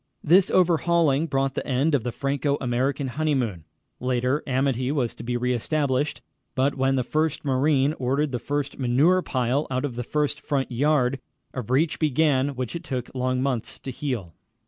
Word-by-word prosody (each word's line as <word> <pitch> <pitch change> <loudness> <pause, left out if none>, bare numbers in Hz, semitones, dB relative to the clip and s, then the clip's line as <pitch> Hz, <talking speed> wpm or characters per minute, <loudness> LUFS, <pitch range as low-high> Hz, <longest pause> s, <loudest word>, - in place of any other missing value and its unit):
This 180 +4 +5
overhauling 170 -4 +3
brought 135 -2 0
the - - -4
end 140 +4 +1
of 135 -6 +2
the 120 - -2
Franco 140 +2 -1
American 130 +3 0
honeymoon. 125 - -1 0.3
Later, 125 +3 0
amity 130 -1 0
was 130 -6 0
to - - -11
be 120 +1 -2
re 125 +1 0
established, 145 +2 -1 0.3
but 135 +2 +2
when 135 0 +1
the 130 - +1
first 155 +4 -1
marine 140 +1 +2
ordered 135 +3 0
the 125 - -2
first 145 +1 -3
manure 140 +9 +3
pile 130 0 0
out 130 +1 -1
of 130 -5 -5
the 125 - -3
first 150 +2 -1
front 135 -2 -1
yard, 135 0 +2 0.3
a 130 - -3
breach 145 +8 0
began 145 -2 +2
which 125 +2 -4
it 170 - -5
took 130 -5 -4
long 130 0 0
months 130 -5 -2
to 135 - -7
heal. 120 - -4
135 Hz, 175 wpm, -25 LUFS, 125-150 Hz, 0.3 s, This